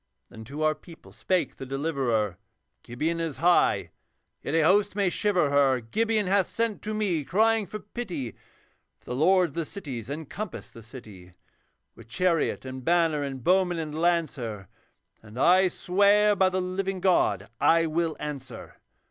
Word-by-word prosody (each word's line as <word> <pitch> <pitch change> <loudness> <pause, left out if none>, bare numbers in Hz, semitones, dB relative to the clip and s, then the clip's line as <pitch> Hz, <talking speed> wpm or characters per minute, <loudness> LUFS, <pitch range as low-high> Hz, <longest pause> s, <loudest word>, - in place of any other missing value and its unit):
Then 110 0 -11
to 145 +6 -5
our 155 0 +3
people 165 +1 -16
spake 185 -2 -1
the 135 - -7
Deliverer, 130 - -1 0.4
'Gibeon 155 +8 -3
is 165 -4 -3
high, 175 +1 +2 0.5
yet 150 - -3
a 165 - +4
host 200 +4 +3
may 200 -3 +2
shiver 180 -9 +1
her; 135 -2 +3
Gibeon 215 - 0
hath 190 0 +2
sent 230 -2 -2
to 215 0 -4
me 190 -8 0
crying 220 +5 +2
for 215 - -6
pity, 185 - -6 0.6
For - - -33
the - - -2
lords 180 +5 +3
of - - -20
the 165 -1 -3
cities 135 - -7
encompass 160 +6 -6
the 115 - -12
city 105 -6 -13 0.6
With 115 - -15
chariot 165 +3 0
and 130 0 -7
banner 165 -1 +2
and 135 -3 -5
bowman 180 0 +2
and 155 -2 -4
lancer, 150 - -1 0.5
And 110 +1 -13
I 185 +5 +5
swear 205 +4 +3
by 190 -1 +3
the 185 0 -1
living 190 +1 -3
God 105 - +2
I 165 0 +4
will 165 0 -1
answer. 135 -5 -7
165 Hz, 160 wpm, -26 LUFS, 135-190 Hz, 0.6 s, I